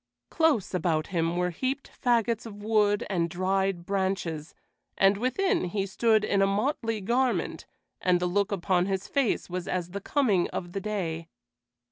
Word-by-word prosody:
Close 320 Hz, -, +2 dB
about 160 Hz, -3 st, +1 dB
him 165 Hz, 0 st, 0 dB
were 180 Hz, 0 st, +1 dB
heaped 260 Hz, +10 st, -3 dB
fagots 235 Hz, -1 st, +2 dB
of 205 Hz, -1 st, -10 dB
wood 210 Hz, -1 st, +2 dB
and 170 Hz, -4 st, 0 dB
dried 185 Hz, 0 st, 0 dB
branches, 190 Hz, -5 st, -2 dB, 0.4 s
and 195 Hz, +1 st, +5 dB
within 345 Hz, -, +1 dB
he 195 Hz, +2 st, -1 dB
stood 215 Hz, +2 st, +2 dB
in 200 Hz, -2 st, +2 dB
a 195 Hz, -, +4 dB
motley 225 Hz, +2 st, 0 dB
garment, 245 Hz, +5 st, 0 dB, 0.3 s
and 180 Hz, -1 st, +3 dB
the 180 Hz, -, 0 dB
look 200 Hz, +3 st, +1 dB
upon 185 Hz, -1 st, +1 dB
his 195 Hz, 0 st, -2 dB
face 275 Hz, -6 st, 0 dB
was 180 Hz, 0 st, -4 dB
as 180 Hz, -1 st, -2 dB
the 200 Hz, +1 st, -5 dB
coming 210 Hz, -9 st, +2 dB
of 175 Hz, -1 st, -5 dB
the 195 Hz, -, -4 dB
day. 170 Hz, -6 st, -3 dB
195 Hz, 160 wpm, -28 LUFS, 180-225 Hz, 0.4 s, and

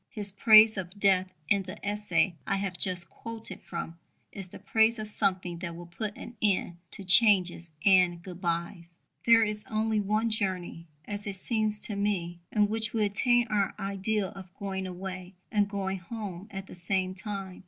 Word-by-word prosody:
His 205 Hz, -5 st, 0 dB
praise 215 Hz, +2 st, +7 dB
of 190 Hz, +2 st, -6 dB
death 190 Hz, -2 st, +3 dB, 0.2 s
in 200 Hz, +2 st, +3 dB
the 190 Hz, +2 st, -8 dB
essay 205 Hz, -2 st, +1 dB
I 195 Hz, -, +1 dB
have 195 Hz, -2 st, -2 dB
just 180 Hz, -1 st, +1 dB
quoted 230 Hz, +5 st, -9 dB
from 170 Hz, -1 st, -6 dB, 0.3 s
is 195 Hz, -2 st, -7 dB
the -, -, -11 dB
praise 220 Hz, +3 st, +2 dB
of 215 Hz, -1 st, -4 dB
something 185 Hz, -4 st, -1 dB
that 170 Hz, -2 st, -5 dB
will 175 Hz, +1 st, -9 dB
put 205 Hz, +5 st, -5 dB
an 235 Hz, -, -9 dB
end 185 Hz, -4 st, +1 dB
to 200 Hz, -, -6 dB
changes 180 Hz, -4 st, +5 dB
and 180 Hz, -3 st, +5 dB
goodbyes 170 Hz, -1 st, -4 dB, 0.3 s
There 230 Hz, -1 st, +7 dB
is 210 Hz, -1 st, -2 dB
only 220 Hz, 0 st, 0 dB
one 215 Hz, +3 st, 0 dB
journey, 185 Hz, -5 st, -2 dB, 0.2 s
as 205 Hz, 0 st, -4 dB
it 200 Hz, -, -3 dB
seems 215 Hz, +1 st, +1 dB
to 210 Hz, -, -4 dB
me... 185 Hz, -4 st, -1 dB
in 210 Hz, -1 st, +3 dB
which 220 Hz, 0 st, -2 dB
we 220 Hz, -2 st, +2 dB
attain 240 Hz, +4 st, +2 dB
our 205 Hz, -2 st, 0 dB
ideal 195 Hz, 0 st, -2 dB
of 190 Hz, -3 st, -11 dB
going 190 Hz, -1 st, -4 dB
away 185 Hz, 0 st, -7 dB, 0.2 s
and 205 Hz, -3 st, +2 dB
going 195 Hz, -2 st, -3 dB
home 195 Hz, -1 st, -7 dB
at 195 Hz, -1 st, -7 dB
the -, -, -12 dB
same 185 Hz, +1 st, -1 dB
time. 195 Hz, -2 st, -6 dB
195 Hz, 175 wpm, -29 LUFS, 185-210 Hz, 0.3 s, praise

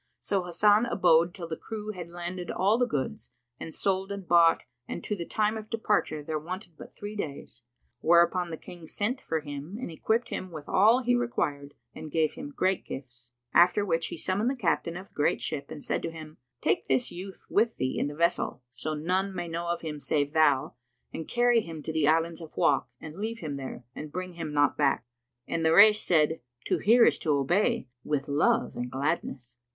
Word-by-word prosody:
So 195 Hz, -2 st, 0 dB
Hasan 205 Hz, +6 st, +4 dB
abode 175 Hz, -6 st, +4 dB
till 175 Hz, -2 st, -7 dB
the 160 Hz, -, -3 dB
crew 215 Hz, +2 st, -6 dB
had 175 Hz, -4 st, -8 dB
landed 175 Hz, +1 st, -5 dB
all 205 Hz, +5 st, +2 dB
the 245 Hz, -, +3 dB
goods 140 Hz, -, -3 dB, 0.3 s
and 160 Hz, -, -6 dB
sold 195 Hz, +2 st, -1 dB
and 200 Hz, -3 st, -6 dB
bought 170 Hz, -1 st, +5 dB, 0.2 s
and -, -, -5 dB
to 210 Hz, -, -2 dB
the 170 Hz, -4 st, -6 dB
time 215 Hz, 0 st, +1 dB
of 215 Hz, 0 st, -8 dB
departure 210 Hz, -9 st, 0 dB
there 155 Hz, +1 st, -2 dB
wanted 175 Hz, +2 st, -7 dB
but -, -, -11 dB
three 205 Hz, +1 st, -7 dB
days; 140 Hz, -, -6 dB, 0.4 s
whereupon 170 Hz, +3 st, +4 dB
the 160 Hz, -, -5 dB
King 170 Hz, 0 st, -11 dB
sent 245 Hz, -, -2 dB
for 160 Hz, -1 st, -2 dB
him 145 Hz, +6 st, -7 dB
and 255 Hz, -, -5 dB
equipped 225 Hz, +9 st, 0 dB
him 185 Hz, -, -4 dB
with 155 Hz, -4 st, -9 dB
all 225 Hz, +6 st, +5 dB
he 245 Hz, +1 st, +2 dB
required 145 Hz, -13 st, -1 dB, 0.2 s
and 155 Hz, -, -8 dB
gave 155 Hz, -1 st, +1 dB
him 280 Hz, +2 st, -7 dB
great 190 Hz, -9 st, 0 dB
gifts: 120 Hz, -2 st, -9 dB, 0.2 s
after 180 Hz, +4 st, +5 dB
which 165 Hz, -3 st, 0 dB
he -, -, -6 dB
summoned 195 Hz, +8 st, 0 dB
the 270 Hz, -, -1 dB
captain 170 Hz, -6 st, 0 dB
of 190 Hz, +2 st, -10 dB
the -, -, -29 dB
great 145 Hz, -, +1 dB
ship 140 Hz, -3 st, -4 dB
and 155 Hz, -2 st, -8 dB
said -, -, -1 dB
to -, -, -3 dB
him, 155 Hz, -1 st, -10 dB, 0.2 s
"Take 115 Hz, -, +1 dB
this 130 Hz, -2 st, +1 dB
youth 190 Hz, +2 st, -9 dB
with 225 Hz, +2 st, +2 dB
thee 130 Hz, -, -1 dB
in -, -, 0 dB
the 145 Hz, -, -6 dB
vessel, 170 Hz, -6 st, 0 dB
so 135 Hz, +5 st, -4 dB
none 185 Hz, +5 st, -1 dB
may 175 Hz, -1 st, -3 dB
know 170 Hz, +1 st, -4 dB
of 170 Hz, 0 st, -1 dB
him 155 Hz, -2 st, -5 dB
save 145 Hz, +1 st, 0 dB
thou, 150 Hz, -4 st, +3 dB, 0.4 s
and 160 Hz, -, -5 dB
carry 240 Hz, -1 st, +3 dB
him 165 Hz, -5 st, -8 dB
to 160 Hz, -, -4 dB
the 155 Hz, -2 st, +2 dB
Islands 165 Hz, +2 st, +2 dB
of 160 Hz, -, -11 dB
Wak 135 Hz, -2 st, +3 dB
and 155 Hz, +3 st, -9 dB
leave 225 Hz, +2 st, -3 dB
him 155 Hz, -8 st, -5 dB
there; 130 Hz, -2 st, -7 dB
and 150 Hz, -1 st, -7 dB
bring 185 Hz, +2 st, -5 dB
him 165 Hz, -3 st, -5 dB
not 145 Hz, 0 st, +3 dB
back." 140 Hz, -4 st, +1 dB, 0.4 s
And 165 Hz, -, -1 dB
the 160 Hz, 0 st, +4 dB
Rais 210 Hz, +1 st, +8 dB
said, 160 Hz, -1 st, +2 dB, 0.2 s
"To -, -, +1 dB
hear 230 Hz, +3 st, +6 dB
is -, -, +3 dB
to 150 Hz, -2 st, +1 dB
obey: 140 Hz, 0 st, +1 dB, 0.2 s
with 145 Hz, -2 st, -1 dB
love 230 Hz, +12 st, +2 dB
and 125 Hz, 0 st, -3 dB
gladness!" 130 Hz, -3 st, -3 dB
170 Hz, 210 wpm, -28 LUFS, 150-200 Hz, 0.4 s, Rais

